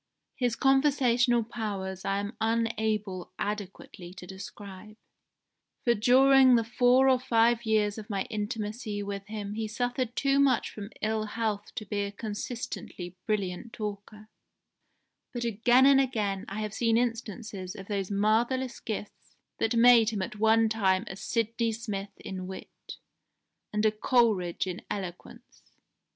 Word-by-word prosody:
His 245 Hz, -3 st, 0 dB
conversational 255 Hz, -3 st, +3 dB
powers 200 Hz, -5 st, -5 dB
I 195 Hz, -, 0 dB
am 205 Hz, +3 st, -4 dB
unable 220 Hz, -5 st, -1 dB
adequately 195 Hz, -3 st, -6 dB
to 180 Hz, -, -9 dB
describe, 195 Hz, +2 st, -10 dB, 0.9 s
for 235 Hz, -, +4 dB
during 260 Hz, +3 st, +6 dB
the 230 Hz, -, +3 dB
four 245 Hz, +3 st, +4 dB
or 260 Hz, -1 st, +4 dB
five 235 Hz, -1 st, +2 dB
years 215 Hz, -1 st, +1 dB
of 215 Hz, +1 st, -10 dB
my 195 Hz, -2 st, -1 dB
intimacy 210 Hz, -1 st, -4 dB
with 200 Hz, 0 st, -6 dB
him 210 Hz, -1 st, -5 dB
he 220 Hz, 0 st, -3 dB
suffered 245 Hz, +2 st, -2 dB
too 275 Hz, 0 st, +2 dB
much 270 Hz, -4 st, +2 dB
from 205 Hz, -1 st, -8 dB
ill 215 Hz, 0 st, 0 dB
health 210 Hz, -1 st, -2 dB
to 220 Hz, -4 st, -5 dB
be 205 Hz, +1 st, -2 dB
a 200 Hz, 0 st, -3 dB
consistently 205 Hz, -4 st, -6 dB
brilliant 210 Hz, +1 st, -2 dB
talker, 210 Hz, 0 st, -7 dB, 1.1 s
but 240 Hz, -1 st, -3 dB
again 240 Hz, +3 st, +4 dB
and 275 Hz, 0 st, +6 dB
again 210 Hz, -7 st, -1 dB
I 205 Hz, +2 st, -4 dB
have 215 Hz, -1 st, -4 dB
seen 230 Hz, 0 st, +2 dB
instances 220 Hz, -5 st, -3 dB
of 195 Hz, -, -9 dB
those 200 Hz, -3 st, -2 dB
marvellous 230 Hz, +5 st, +1 dB
gifts 215 Hz, -2 st, -7 dB, 0.2 s
that 225 Hz, +1 st, +1 dB
made 230 Hz, -1 st, +7 dB
him 210 Hz, -4 st, -2 dB
at 205 Hz, -, -7 dB
one 225 Hz, +1 st, +4 dB
time 195 Hz, -3 st, +1 dB
a 190 Hz, -, -7 dB
Sydney 230 Hz, +2 st, -1 dB
Smith 210 Hz, -3 st, -4 dB
in 185 Hz, -1 st, -6 dB
wit, 190 Hz, -, -10 dB, 0.8 s
and 210 Hz, +1 st, 0 dB
a 215 Hz, -, +5 dB
Coleridge 215 Hz, -6 st, +1 dB
in 185 Hz, -1 st, -5 dB
eloquence. 185 Hz, -4 st, -8 dB
215 Hz, 140 wpm, -28 LUFS, 200-235 Hz, 1.1 s, made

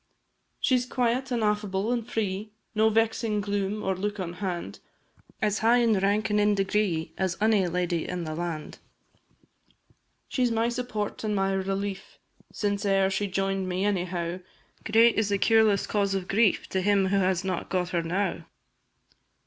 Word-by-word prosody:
She 255 Hz, -1 st, +3 dB
's 245 Hz, -, -5 dB
quiet, 250 Hz, +1 st, 0 dB
an' 235 Hz, -2 st, 0 dB
affable, 210 Hz, 0 st, 0 dB
an' 240 Hz, -, 0 dB
free, 210 Hz, -1 st, -3 dB, 0.2 s
No 220 Hz, 0 st, +4 dB
vexing 225 Hz, -1 st, +1 dB
gloom 205 Hz, 0 st, -2 dB
or 190 Hz, 0 st, 0 dB
look 205 Hz, +2 st, -3 dB
at 175 Hz, -2 st, -4 dB
hand, 180 Hz, -2 st, -4 dB, 0.6 s
As 210 Hz, -1 st, +1 dB
high 230 Hz, +2 st, +4 dB
in 230 Hz, -4 st, +3 dB
rank 205 Hz, +2 st, +1 dB
and 210 Hz, -, +3 dB
in 205 Hz, 0 st, +3 dB
degree 195 Hz, -4 st, 0 dB
As 190 Hz, -2 st, 0 dB
any 210 Hz, -3 st, +3 dB
lady 175 Hz, -1 st, -1 dB
in 180 Hz, -1 st, -3 dB
the 155 Hz, -1 st, -4 dB
land; 165 Hz, -2 st, -5 dB, 1.5 s
She 255 Hz, -, -1 dB
's 245 Hz, -, +3 dB
my 230 Hz, 0 st, +1 dB
support 235 Hz, -4 st, -4 dB
and 210 Hz, -1 st, -1 dB
my 195 Hz, 0 st, +1 dB
relief, 195 Hz, 0 st, -3 dB, 0.3 s
Since 205 Hz, -1 st, -1 dB
e'er 195 Hz, -1 st, +2 dB
she 200 Hz, +1 st, -1 dB
join'd 195 Hz, 0 st, -1 dB
me, 185 Hz, +2 st, -1 dB
any 195 Hz, -3 st, +1 dB
how; 175 Hz, 0 st, -3 dB, 0.5 s
Great 225 Hz, 0 st, +5 dB
is 215 Hz, -2 st, 0 dB
the 200 Hz, -, +2 dB
cureless 220 Hz, -1 st, +3 dB
cause 200 Hz, -2 st, 0 dB
of 185 Hz, -1 st, -3 dB
grief 210 Hz, 0 st, +2 dB
To 190 Hz, -, 0 dB
him 195 Hz, -1 st, +2 dB
who 200 Hz, -, +2 dB
has 185 Hz, -2 st, +1 dB
not 185 Hz, -2 st, -3 dB
got 180 Hz, -2 st, -1 dB
her 175 Hz, -2 st, 0 dB
now! 180 Hz, +5 st, -2 dB
200 Hz, 175 wpm, -27 LUFS, 190-215 Hz, 1.5 s, Great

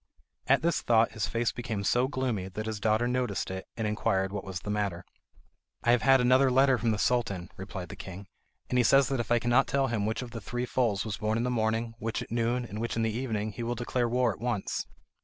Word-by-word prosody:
At 135 Hz, +2 st, +4 dB
this 170 Hz, 0 st, +1 dB
thought 115 Hz, -1 st, +3 dB
his 110 Hz, -2 st, -2 dB
face 115 Hz, 0 st, 0 dB
became 115 Hz, -5 st, -4 dB
so 120 Hz, +5 st, +2 dB
gloomy 125 Hz, -8 st, -2 dB
that 105 Hz, +3 st, -5 dB
his 110 Hz, -1 st, -3 dB
daughter 110 Hz, +3 st, +2 dB
noticed 125 Hz, -7 st, -1 dB
it, 95 Hz, 0 st, -6 dB
and 110 Hz, -, -1 dB
inquired 95 Hz, -2 st, 0 dB
what 100 Hz, -, -3 dB
was 95 Hz, -2 st, -5 dB
the 105 Hz, -, -4 dB
matter. 100 Hz, -4 st, -2 dB, 0.8 s
"I 120 Hz, -, +4 dB
have 120 Hz, -2 st, +4 dB
had 135 Hz, +2 st, +5 dB
another 130 Hz, +2 st, +5 dB
letter 130 Hz, 0 st, +4 dB
from 115 Hz, +1 st, 0 dB
the 110 Hz, -, +1 dB
Sultan," 100 Hz, -7 st, 0 dB
replied 95 Hz, -2 st, -7 dB
the -, -, -7 dB
king, 95 Hz, +1 st, -9 dB, 0.4 s
"and 125 Hz, -, +1 dB
he -, -, +5 dB
says 135 Hz, +3 st, +5 dB
that 135 Hz, -2 st, -1 dB
if 120 Hz, -, -3 dB
I 120 Hz, -, +5 dB
cannot 120 Hz, +3 st, +3 dB
tell 135 Hz, -1 st, +1 dB
him 105 Hz, -3 st, 0 dB
which 110 Hz, +3 st, -2 dB
of 120 Hz, -, -9 dB
three 120 Hz, +2 st, -4 dB
foals 115 Hz, -6 st, 0 dB
was 110 Hz, -2 st, -3 dB
born 110 Hz, +1 st, 0 dB
in 115 Hz, -, 0 dB
the 125 Hz, -, 0 dB
morning, 115 Hz, 0 st, 0 dB
which 115 Hz, 0 st, -2 dB
at -, -, -15 dB
noon, 120 Hz, +1 st, 0 dB
and 110 Hz, -1 st, -6 dB
which 115 Hz, -, -2 dB
in 115 Hz, -, 0 dB
the 110 Hz, -1 st, 0 dB
evening, 110 Hz, -3 st, -2 dB
he 105 Hz, -, -7 dB
will 120 Hz, +1 st, -2 dB
declare 120 Hz, 0 st, -1 dB
war 125 Hz, -2 st, +2 dB
at -, -, -14 dB
once." 120 Hz, -5 st, -2 dB
115 Hz, 245 wpm, -29 LUFS, 105-125 Hz, 0.8 s, had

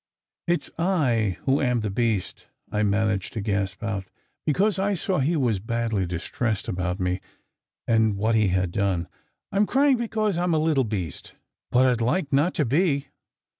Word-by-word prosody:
"It 175 Hz, 0 st, +1 dB
s -, -, -10 dB
I 125 Hz, -, +1 dB
who 135 Hz, +1 st, +2 dB
am 125 Hz, -4 st, +1 dB
the 105 Hz, -2 st, -2 dB
beast," 110 Hz, -3 st, -1 dB, 0.2 s
I 105 Hz, -, 0 dB
managed 105 Hz, -1 st, 0 dB
to 115 Hz, -, -3 dB
gasp 100 Hz, -1 st, -2 dB
out, 100 Hz, -3 st, -2 dB, 0.4 s
be -, -, +4 dB
cause 200 Hz, +4 st, +1 dB
I 200 Hz, +1 st, +1 dB
saw 185 Hz, 0 st, -1 dB
he 150 Hz, +6 st, +1 dB
was 120 Hz, -8 st, +1 dB
badly 110 Hz, -2 st, -1 dB
distressed 100 Hz, +5 st, -2 dB
about 90 Hz, +1 st, -2 dB
me, 90 Hz, 0 st, -1 dB, 0.7 s
and 110 Hz, -3 st, +3 dB
what 110 Hz, +3 st, +1 dB
he 110 Hz, -2 st, +3 dB
had 90 Hz, -1 st, 0 dB
done. 95 Hz, -3 st, 0 dB, 0.4 s
"I 195 Hz, -, -2 dB
m 205 Hz, +1 st, +4 dB
crying 275 Hz, 0 st, +4 dB
because 215 Hz, -5 st, -1 dB
I -, -, 0 dB
m 170 Hz, -2 st, +2 dB
a -, -, +3 dB
little 155 Hz, -4 st, +2 dB
beast. 95 Hz, -9 st, -5 dB, 0.3 s
But 125 Hz, +1 st, +4 dB
I 130 Hz, -, +4 dB
d 115 Hz, -1 st, -2 dB
like 145 Hz, +4 st, 0 dB
not 150 Hz, +7 st, +2 dB
to 150 Hz, -, +1 dB
be." 140 Hz, 0 st, +1 dB
115 Hz, 190 wpm, -25 LUFS, 100-160 Hz, 0.7 s, be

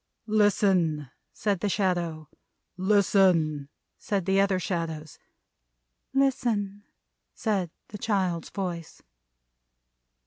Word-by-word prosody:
"Listen!" 190 Hz, -, +2 dB, 0.2 s
said 205 Hz, -4 st, -1 dB
the 205 Hz, -, 0 dB
Shadow. 175 Hz, -6 st, -1 dB, 0.5 s
"Listen!" 185 Hz, -7 st, +3 dB, 0.3 s
said 195 Hz, -4 st, -1 dB
the 195 Hz, +1 st, +3 dB
other 195 Hz, -1 st, +2 dB
Shadows. 160 Hz, -4 st, -4 dB, 0.9 s
"Listen!" 235 Hz, -7 st, +1 dB, 0.5 s
said 200 Hz, -6 st, 0 dB, 0.2 s
the 210 Hz, -, -8 dB
child's 185 Hz, -6 st, 0 dB
voice. 175 Hz, -4 st, -5 dB
190 Hz, 80 wpm, -27 LUFS, 170-205 Hz, 0.9 s, Listen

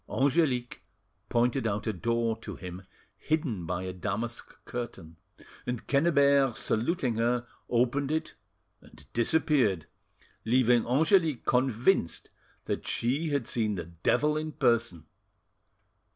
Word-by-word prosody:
Angelique 135 Hz, -3 st, +1 dB, 0.5 s
pointed 120 Hz, +1 st, +1 dB
out 105 Hz, 0 st, -2 dB
a 110 Hz, -, -1 dB
door 115 Hz, +4 st, 0 dB
to -, -, -7 dB
him 90 Hz, +1 st, -9 dB, 0.3 s
hidden 130 Hz, -, -2 dB
by 90 Hz, +1 st, -2 dB
a 95 Hz, 0 st, -4 dB
damask 105 Hz, +6 st, -4 dB
curtain, 110 Hz, -10 st, -7 dB, 0.5 s
and 125 Hz, -2 st, -3 dB
Quennebert 140 Hz, -4 st, +3 dB
saluting 120 Hz, 0 st, 0 dB
her, 120 Hz, +1 st, +1 dB, 0.2 s
opened 125 Hz, +4 st, +1 dB
it 160 Hz, +1 st, -2 dB, 0.5 s
and -, -, -17 dB
disappeared, 120 Hz, -, +2 dB, 0.6 s
leaving 120 Hz, 0 st, +3 dB
Angelique 155 Hz, -, +3 dB
convinced 125 Hz, -, +1 dB, 0.3 s
that -, -, -3 dB
she 140 Hz, +7 st, 0 dB
had 140 Hz, -5 st, 0 dB
seen 110 Hz, -3 st, -1 dB
the 85 Hz, -3 st, -5 dB
devil 90 Hz, -, +1 dB
in 155 Hz, 0 st, -4 dB
person. 115 Hz, -, +1 dB
120 Hz, 115 wpm, -29 LUFS, 110-140 Hz, 0.6 s, Quennebert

